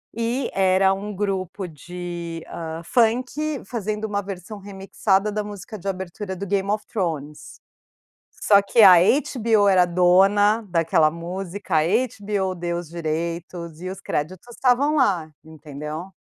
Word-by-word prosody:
e 235 +3 -1
era 190 0 +3
um 205 +2 -5
grupo 195 -1 -3
de, 170 +1 -7
hã, 165 0 -6
funk 255 - 0
fazendo 215 -1 -3
uma 205 -1 -2
versão 195 +2 -7
remixada 195 +1 -1
da 210 0 -2
música 205 +1 -8
de 195 - -8
abertura 190 +1 -5
do 200 - -5
Game 195 0 0
of 210 0 -2
Thrones. 155 -7 -3 1.0
Só 200 -1 +5
que 210 +3 +3
a 185 -2 +10 0.4
HBO 220 -5 +3
era 185 -2 +5
dona 195 +5 +4
daquela 165 -2 +3
música. 175 +2 -4
A 155 - +5 0.4
HBO 200 -2 -1
deu 170 0 -3
os 175 -3 -7
direitos 170 0 -4
e 185 - -4
os 190 - -8
créditos 170 +8 -4
estavam 270 +4 +2
lá, 180 - +1
entendeu? 155 +1 -8
190 Hz, 140 wpm, -23 LUFS, 170-210 Hz, 1.0 s, a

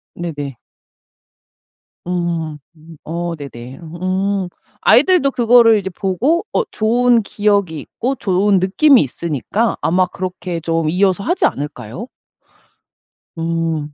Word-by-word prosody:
네네. 145 -6 -5 1.5
음 170 -3 -2 0.5
어 170 +1 -4
네네. 130 -4 -9
음 185 +3 -2 0.3
아이들도 355 -8 +4
그거를 235 -2 +5
이제 190 -2 -3
보고 215 - 0
어 - - +2
좋은 235 +2 +3
기억이 200 -6 0
있고 260 - -3
좋은 195 -2 +2
느낌이 250 +9 +4
있으니까 170 - -2
아마 185 +2 +2
그렇게 180 -1 -5
좀 165 -1 0
이어서 190 +3 +1
하지 350 - +1
않을까요? 145 - -4 1.3
음 165 -2 -2
185 Hz, 220 characters per minute, -18 LUFS, 165-215 Hz, 1.5 s, 그거를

